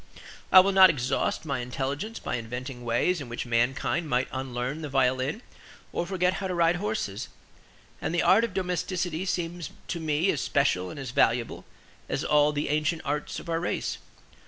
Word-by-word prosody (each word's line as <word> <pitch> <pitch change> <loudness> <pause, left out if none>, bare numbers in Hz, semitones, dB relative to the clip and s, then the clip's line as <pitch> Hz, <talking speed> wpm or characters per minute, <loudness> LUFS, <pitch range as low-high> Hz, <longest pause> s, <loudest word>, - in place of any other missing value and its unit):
I 185 - +11
will 195 +2 +1
not 190 -1 +8
exhaust 135 +2 -1
my 140 -4 -1
intelligence 140 - -3
by - - -3
inventing 125 +2 -6
ways 120 +9 +1
in 130 - -7
which 120 - -4
mankind 125 +7 0
might 125 0 +1
unlearn 130 +3 -3
the 150 - -5
violin 130 - +1 0.5
or 175 - -2
forget 180 -1 +1
how 190 - -1
to 180 - -2
ride 170 0 +3
horses; 205 - -3 0.7
and - - -2
the 175 - +1
art 210 +5 +5
of 230 -5 -3
domesticity 180 -1 -2
seems 175 -2 -2 0.2
to 170 - -2
me 160 +3 +1
as 140 - -2
special 95 -10 +1
and - - -8
as 135 -3 -5
valuable 120 -1 +1 0.4
as - - -1
all 150 0 +4
the 145 0 -2
ancient 155 +2 0
arts 145 +1 -2
of - - -12
our 165 -1 0
race. 175 - -2
150 Hz, 180 wpm, -27 LUFS, 130-175 Hz, 0.7 s, I